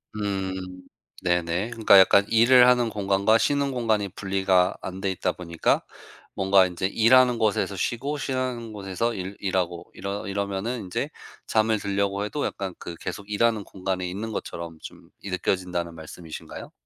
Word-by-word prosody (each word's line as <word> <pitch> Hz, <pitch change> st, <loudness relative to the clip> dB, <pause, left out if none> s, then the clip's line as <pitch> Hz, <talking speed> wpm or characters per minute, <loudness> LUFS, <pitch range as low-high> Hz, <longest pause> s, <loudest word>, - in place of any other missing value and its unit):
음. 95 Hz, -3 st, -4 dB, 0.4 s
네네. 90 Hz, +4 st, 0 dB
그러니까 110 Hz, -4 st, +5 dB
약간 100 Hz, +1 st, +6 dB
일을 125 Hz, +2 st, +6 dB
하는 125 Hz, -2 st, +4 dB
공간과 100 Hz, +1 st, +2 dB
쉬는 140 Hz, +4 st, +1 dB
공간이 110 Hz, -5 st, 0 dB
분리가 95 Hz, -1 st, +1 dB
안 95 Hz, +1 st, -6 dB
돼있다 95 Hz, -2 st, -1 dB
보니까 85 Hz, -2 st, 0 dB, 0.5 s
뭔가 95 Hz, -1 st, +4 dB
이제 90 Hz, +1 st, -4 dB
일하는 120 Hz, +4 st, +4 dB
곳에서 105 Hz, -2 st, +1 dB
쉬고 130 Hz, +9 st, -2 dB
쉬는 130 Hz, -4 st, -3 dB
곳에서 105 Hz, +3 st, -2 dB
일 95 Hz, +1 st, -5 dB
일하고 90 Hz, -2 st, -2 dB
이러 100 Hz, +2 st, -5 dB
이러면은 100 Hz, +4 st, -2 dB
인제 90 Hz, -1 st, -3 dB, 0.4 s
잠을 110 Hz, 0 st, +2 dB
들려고 100 Hz, 0 st, -1 dB
해도 140 Hz, +8 st, -2 dB
약간 95 Hz, -2 st, -4 dB
그 85 Hz, -, -7 dB
계속 100 Hz, 0 st, -6 dB
일하는 110 Hz, 0 st, +2 dB
공간에 95 Hz, -1 st, -3 dB
있는 105 Hz, +5 st, -5 dB
것처럼 85 Hz, -5 st, -6 dB
좀 -, -, -11 dB
이 100 Hz, -, -6 dB
느껴진다는 90 Hz, -2 st, -2 dB
말씀이신가요? 80 Hz, 0 st, -9 dB
100 Hz, 340 characters per minute, -25 LUFS, 90-110 Hz, 0.5 s, 약간